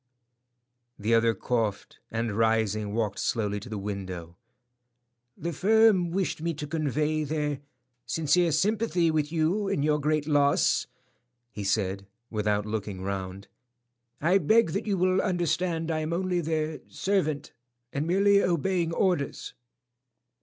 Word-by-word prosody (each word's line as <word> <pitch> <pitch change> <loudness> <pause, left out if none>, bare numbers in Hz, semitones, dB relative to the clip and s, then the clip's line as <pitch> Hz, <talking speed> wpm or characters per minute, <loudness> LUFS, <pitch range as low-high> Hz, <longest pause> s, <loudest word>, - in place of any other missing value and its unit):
The 110 +3 0
other 115 0 +4
coughed, 110 -5 -2
and 115 0 -2
rising, 110 -2 +1
walked 110 -3 -1
slowly 105 -3 -1
to 105 - -10
the 110 - -4
window. 95 -4 -6 1.0
"The 170 +2 -4
firm 210 0 +4
wished 185 -2 -2
me 165 0 -1
to 150 - -5
convey 155 0 -1
their 150 -1 -2 0.5
sincere 165 +2 +2
sympathy 185 0 +1
with 155 -1 0
you 170 +6 +1
in 145 - 0
your 150 0 +2
great 150 0 0
loss," 145 -2 +3 0.6
he 105 - -6
said, 100 -1 -1 0.2
without 105 -1 0
looking 105 -3 -4
round. 95 0 -5 0.7
"I 175 +6 +3
beg 220 -4 +3
that - - -3
you 200 -2 +1
will 185 +1 +2
understand 175 -3 0
I 160 - 0
am 155 +1 -2
only 180 0 0
their 155 -1 -2
servant 180 -7 -1 0.4
and 145 +3 -1
merely 200 +3 +4
obeying 175 -1 0
orders." 170 -5 -1
155 Hz, 130 wpm, -27 LUFS, 110-175 Hz, 1.0 s, other